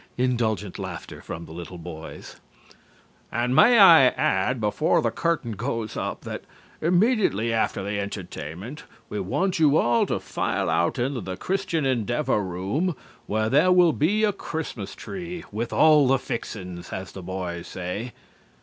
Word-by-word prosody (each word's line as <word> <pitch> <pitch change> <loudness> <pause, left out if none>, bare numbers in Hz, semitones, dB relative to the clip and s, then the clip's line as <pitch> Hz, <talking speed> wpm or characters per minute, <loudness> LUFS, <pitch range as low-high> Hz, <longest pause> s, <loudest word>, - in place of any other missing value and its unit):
(Indulgent 115 -6 0
laughter - - -7
from 85 - -7
the - - -13
little 85 +2 -8
boys). 80 -2 -9 0.9
And 120 +2 0
may 240 - +7
I 170 - +9
add 125 0 +1
before 130 +11 +2
the - - 0
curtain 165 -8 -1
goes 115 0 -3
up - - -3
that - - -6 0.4
immediately 175 - +2
after 110 -3 0
the 100 +1 -2
entertainment 100 - -6 0.3
we 105 - -3
want 180 - -1
you 155 -1 +5
all 120 -4 +3
to - - -1
file - - -1
out 85 +7 +1
into 125 0 -1
the 95 -1 -5
Christian 185 - -1
Endeavor 120 -1 +1
room, 100 - -2 0.3
where 110 +1 0
there 150 +10 +4
will 180 -3 +5
be 190 - +1
a 210 -1 +3
Christmas 155 - -5
tree, 175 -2 -7
'with 115 +3 -3
all 150 -3 +5
the 135 +1 +4
fixin's,' 90 -8 -6
as 95 0 -5
the 95 - -8
boys 90 -1 -5
say." 95 +7 -5
120 Hz, 150 wpm, -25 LUFS, 95-160 Hz, 0.9 s, I